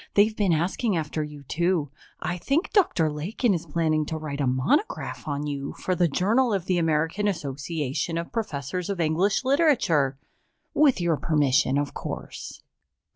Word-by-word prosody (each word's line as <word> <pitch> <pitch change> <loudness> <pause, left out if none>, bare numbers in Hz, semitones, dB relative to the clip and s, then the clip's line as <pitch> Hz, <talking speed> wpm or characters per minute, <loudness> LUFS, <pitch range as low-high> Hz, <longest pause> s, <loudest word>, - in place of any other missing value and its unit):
They've 215 +2 +4
been 200 -4 +2
asking 180 +5 +1
after 155 0 -2
you, 150 -1 -9
too. 170 0 0 0.3
I 175 +3 -2
think 285 - 0
Dr. 335 - +3
Lakin 195 - 0
is 170 -1 -3
planning 155 0 +1
to 160 - -3
write 150 -2 -4
a 135 - +1
monograph 135 - 0
on 145 0 -2
you 140 -1 -4
for 185 - -2
the 175 -1 +3
Journal 220 - +2
of 185 -3 -3
the 180 -2 +1
American 165 +5 +1
Association 150 -1 -2
of 170 0 -4
Professors 180 - -3
of 195 -3 -2
English 170 - +2
Literature 215 - +3 0.6
with 290 -7 +4
your 170 -3 +1
permission, 145 -3 +2
of 145 -1 -1
course." - - -7
165 Hz, 160 wpm, -25 LUFS, 150-200 Hz, 0.6 s, They've